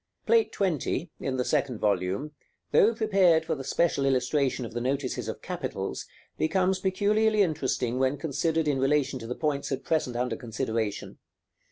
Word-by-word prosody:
§ - - -56
XI. - - -51
Plate 225 -1 +3
XX., 180 -2 -1
in 130 -1 -2
the 125 - 0
second 130 -5 0
volume, 100 +7 0 0.4
though 225 +3 +5
prepared 195 -7 +3
for 160 - -1
the 135 -3 -5
special 140 +1 +1
illustration 135 0 +1
of 115 - -8
the 120 - -3
notices 135 +1 -2
of - - -6
capitals, - - -4 0.3
becomes 185 +4 +1
peculiarly 210 +3 +2
interesting 130 -7 -1
when 135 +2 +1
considered 160 +2 0
in 140 -2 +1
relation 135 -1 +1
to 115 - -8
the 125 - -3
points 145 -3 -2
at 135 -1 -2
present 155 -7 0
under 125 -1 -1
consideration. 110 -3 -3
140 Hz, 170 wpm, -27 LUFS, 125-170 Hz, 0.4 s, though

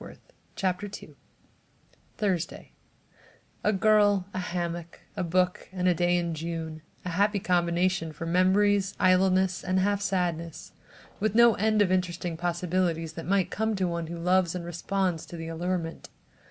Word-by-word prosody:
THURSDAY 190 -5 -2 0.9
A 210 - +3
girl, 205 -1 +3
a 185 - -2
hammock, 170 -1 -4
a - - -2
book 180 +1 0
and 185 -1 -1
a 180 - +5
day 175 +1 +2
in 170 -1 -1
June: 160 0 -5 0.2
a - - -2
happy 200 +4 +2
combination 175 -1 +1
for 165 - -7
memories, 190 +3 +3
idleness 185 0 +3
and 185 0 +1
half 200 +1 +1
sadness, 175 -4 -2 0.5
with 215 0 0
no 235 0 +7
end 215 +1 +2
of 185 - 0
interesting 180 -2 -1
possibilities 170 -1 -1
that 165 - -7
might 190 -2 +1
come 220 0 0
to 190 -2 0
one 170 -1 -3
who 170 +1 -6
loves 180 0 +2
and 175 -1 -4
responds 175 0 -1
to 170 - -8
the 165 0 -6
allurement. 170 0 -3
180 Hz, 140 wpm, -27 LUFS, 170-190 Hz, 0.9 s, no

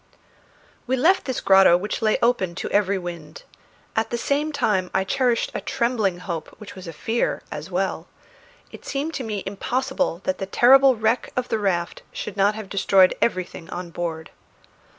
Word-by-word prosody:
We 260 - +1
left 345 +9 +3
this 260 -3 -3
grotto 190 -2 +6
which 205 +6 -4
lay 215 -1 +2
open 195 -8 +1
to - - -5
every 200 -1 +2
wind. 170 -4 -8 0.5
At 225 0 0
the 240 - -2
same 290 +5 0
time 210 -10 0
I 190 - +3
cherished 245 +4 0
a - - -3
trembling 225 -7 0
hope 170 -3 -5
which 210 - -10
was 185 -2 -10
a - - -5
fear 225 +9 -2
as 150 +3 -6
well. 190 +1 -2 0.6
It - - -12
seemed 285 +4 -3
to 265 - -3
me 210 -4 -4
impossible 255 - -2
that 185 - -2
the 195 - -3
terrible 265 +5 +6
wreck 220 +2 0
of 250 0 -2
the 225 - 0
raft 175 -4 -1
should 205 - -6
not 205 +1 +2
have 215 -2 -7
destroyed 190 -1 +4
everything 185 -6 -2
on 175 -1 -6
board. 165 -2 -5
200 Hz, 175 wpm, -23 LUFS, 185-245 Hz, 0.6 s, grotto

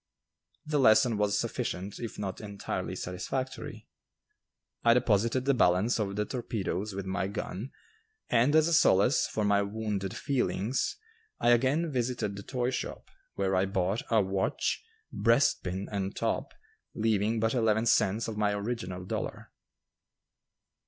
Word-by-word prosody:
The 150 -1 0
lesson 115 -1 +5
was 105 -1 +1
sufficient 95 0 -3
if 115 -2 -6
not 95 -1 -4
entirely 100 -2 -4
satisfactory. 130 +9 -5 1.0
I 115 0 +6
deposited 115 +1 +2
the 140 - +4
balance 105 +1 +3
of 100 -2 -2
the 105 +1 0
torpedoes 105 -5 -3
with 100 0 -4
my 95 0 -1
gun, 105 +3 -5 0.6
and 125 +6 +3
as 160 0 +5
a 170 - +1
solace 125 -5 +4
for 110 - -1
my 100 0 +3
wounded 100 -2 -3
feelings 130 -4 -1 0.4
I 120 - +3
again 135 +7 +2
visited 120 -5 -1
the 100 - -7
toy 125 +3 -2
shop, - - -5 0.2
where 95 -1 0
I 95 +1 +2
bought 95 +2 0
a 115 -2 +4
watch, 95 0 -1 0.3
breastpin 100 -5 +2
and 100 -1 -2
top, - - -1 0.4
leaving 110 0 +1
but 110 +1 +1
eleven 110 -2 +2
cents 110 0 +2
of 110 - -4
my 105 -1 +2
original 100 -4 -4
dollar. - - -5
105 Hz, 140 wpm, -29 LUFS, 100-120 Hz, 1.0 s, I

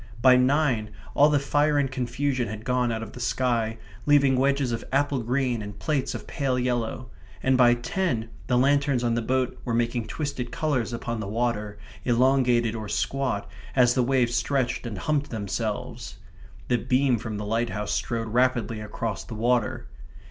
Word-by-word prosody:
By 130 +1 +7
nine 125 -4 +2 0.2
all 145 +1 +5
the 150 - +3
fire 145 +2 +2
and 135 -2 +1
confusion 130 0 -1
had 110 +2 -7
gone 125 -1 +1
out 110 0 -3
of 110 - -8
the 125 - -10
sky, 115 -3 0 0.3
leaving 140 -2 +5
wedges 135 0 +1
of 115 - -3
apple 140 -1 +1
green 125 0 0
and 105 0 -7
plates 150 -4 -1
of - - -7
pale 135 -3 -1
yellow; 125 -1 -2 0.3
and 130 0 +3
by 120 -1 +6
ten 120 - -2 0.2
the 125 - +2
lanterns 140 -1 +2
on 120 -1 +1
the 120 - 0
boat 130 +2 -1
were 120 -3 -1
making 120 -1 0
twisted 140 -5 -4
colours 130 -5 -1
upon 120 -1 -4
the 105 - -4
waves, 105 -1 -1 0.3
elongated 125 -2 +3
or 110 -2 -5
squat, 115 +1 -1 0.3
as 125 -2 +5
the 130 - +2
waves 125 -1 +2
stretched 125 0 0
or 105 -4 -5
humped 145 +2 0
themselves. 110 0 -4 0.5
The 120 - +2
beam 125 0 +2
from 110 -1 -5
the 105 - -4
lighthouse 110 -1 -1
strode 115 -1 -2
rapidly 120 -2 +1
across 105 0 -4
the 115 - -8
water. 120 0 0
125 Hz, 170 wpm, -26 LUFS, 115-135 Hz, 0.5 s, By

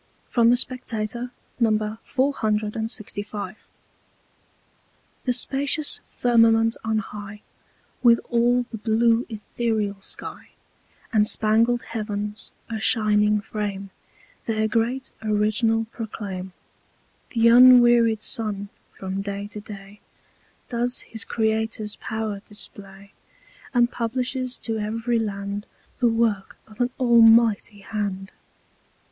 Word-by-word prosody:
HYMN - - -38
From 235 -1 +5
the 245 - +5
Spectator, 240 -1 -3 0.3
No. 215 -1 +1
465 215 -5 -2 1.7
The 250 - +2
Spacious 280 +4 +1
Firmament 230 -1 +3
on 220 0 0
high 210 0 -7 0.6
With 235 -2 +6
all 240 +1 +3
the 225 - -6
blue 230 +2 +2
Etherial 215 -2 -3
Sky, - - -5 0.6
And 210 -1 +4
Spangled 230 +3 +2
Heav'ns, 210 -1 -5 0.2
a 225 -1 -4
Shining 210 -2 +3
Frame, 200 -2 -5 0.6
Their 220 -1 +1
great 240 +4 -1
Original 215 +1 +1
proclaim: 200 -5 -6 0.8
Th' 230 -2 +1
unwearied 240 -2 +7
Sun, 210 -4 -1 0.2
from 190 0 -5
Day 200 0 -5
to 210 - -7
Day, 205 -1 -11 0.7
Does 245 +1 0
his 225 - -7
Creator's 220 -1 -2
Pow'r 220 -2 -4
display, 200 -1 -7 0.6
And 240 -2 +3
publishes 250 +2 -2
to 225 -1 -2
every 230 +3 -1
Land 200 -1 -4 0.3
The 245 -3 +4
Work 225 -4 0
of 215 +2 -9
an 245 - +2
Almighty 230 -3 +5
Hand. 195 -2 -4
220 Hz, 105 wpm, -24 LUFS, 210-235 Hz, 1.7 s, unwearied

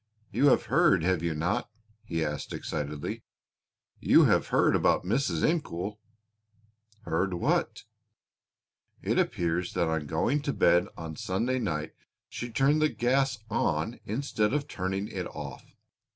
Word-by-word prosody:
"You 145 - +3
have 135 - +4
heard, - - +3
have 90 -1 +1
you 85 -2 -1
not?" 80 +3 -1 0.3
he 80 -2 -2
asked 75 -1 -4
excitedly, 75 0 -4 0.8
"you - - +6
have - - +3
heard - - +3
about - - +2
Mrs. 125 +10 +1
Incoul?" 105 - -2 1.0
"Heard 90 +2 0
what?" 85 - 0 1.2
"It - - +1
appears 85 +1 0
that 85 - +1
on 80 -2 -2
going 115 - 0
to 140 -1 -2
bed 90 +3 +4
on 80 -2 -7
Sunday 115 - -1
night 80 -9 -3 0.3
she 120 - -6
turned 140 +6 +2
the 155 - +4
gas 135 +2 +1
on - - 0
instead 110 -1 0
of 145 -1 -1
turning 95 -2 -3
it - - -4
off. - - -9
95 Hz, 135 wpm, -28 LUFS, 80-130 Hz, 1.2 s, you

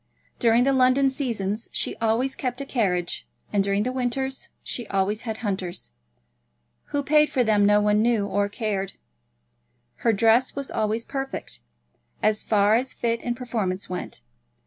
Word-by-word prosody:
During 235 0 +4
the 275 +1 +3
London 265 +1 +4
seasons 230 -6 -3
she - - -1
always 230 +4 +1
kept 250 -1 -3
a 275 - -4
carriage, 180 -10 -1 0.3
and 200 -1 +3
during 200 +1 +1
the 250 - -1
winters 265 +1 -2
she 240 -3 -5
always 195 +2 0
had 220 - -3
hunters. 190 - -3 0.9
Who 285 0 -2
paid 300 +1 +4
for 255 - +2
them 210 -3 +4
no 210 0 +5
one 210 0 +3
knew 225 -3 +2
or 200 0 0
cared. 200 -3 -2 1.0
Her 230 - +2
dress 225 +4 +3
was 280 -1 -4
always 220 +2 -1
perfect, 270 - -4 0.6
as 215 0 +2
far 205 -1 +3
as 255 +3 0
fit 230 -1 0
and 240 -1 -2
performance 205 -8 -3
went. 180 - -5
225 Hz, 155 wpm, -25 LUFS, 205-255 Hz, 1.0 s, no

